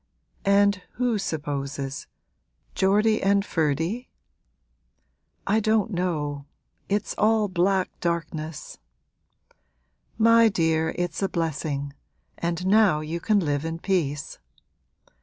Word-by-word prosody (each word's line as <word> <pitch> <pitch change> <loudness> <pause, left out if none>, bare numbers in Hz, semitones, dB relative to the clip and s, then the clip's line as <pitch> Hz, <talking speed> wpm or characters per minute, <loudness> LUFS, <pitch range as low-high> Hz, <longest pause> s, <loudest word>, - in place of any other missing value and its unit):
'And 200 -1 +4
who 240 -3 0
supposes 145 -5 -4 0.7
Geordie 210 +3 +2
and 200 +1 +2
Ferdy?' 165 - -1 1.4
'I 210 +3 +2
don't 220 0 +1
know; 150 -6 -2 0.4
it's 205 +1 -1
all 215 0 +3
black 185 +1 +1
darkness!' 165 -3 -4 1.4
'My 230 0 +6
dear, 160 -4 0
it's 175 +2 -2
a 195 - +1
blessing, 150 -4 -2 0.5
and 170 +1 -2
now 195 -6 +4
you 160 +3 -4
can 210 +3 +2
live 145 -3 -1
in 165 0 -3
peace.' 165 -6 -2
175 Hz, 100 wpm, -25 LUFS, 155-205 Hz, 1.4 s, My